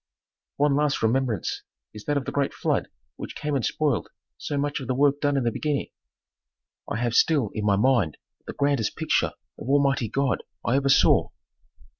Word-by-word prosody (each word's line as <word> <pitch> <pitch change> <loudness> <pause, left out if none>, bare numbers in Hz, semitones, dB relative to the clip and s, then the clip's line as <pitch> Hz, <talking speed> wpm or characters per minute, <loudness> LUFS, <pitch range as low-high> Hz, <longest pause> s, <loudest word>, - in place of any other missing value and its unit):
One 145 -1 +2
last 145 -3 +1
remembrance 115 -4 0 0.3
is 105 - -10
that 145 -1 0
of 135 - -2
the - - -3
great 140 -1 -1
flood - - 0 0.3
which - - -7
came 150 -1 -2
and 130 - 0
spoiled 145 -4 0 0.3
so 145 - -4
much 145 +1 -1
of 130 - -7
the 130 - 0
work 145 +1 +2
done 145 -1 +1
in 135 - +1
the 120 - +1
beginning; 150 +3 -2 1.0
I - - -1
have 120 0 -1
still 140 -5 +3
in 105 -2 -3
my 100 -1 +4
mind 110 - +2 0.3
the - - -5
grandest 140 -6 0
picture - - 0 0.3
of 120 - -7
Almighty 140 -5 +2
God 135 -3 0 0.2
I 115 - +2
ever 140 0 +2
saw. 135 - +4
135 Hz, 185 wpm, -25 LUFS, 115-145 Hz, 1.0 s, my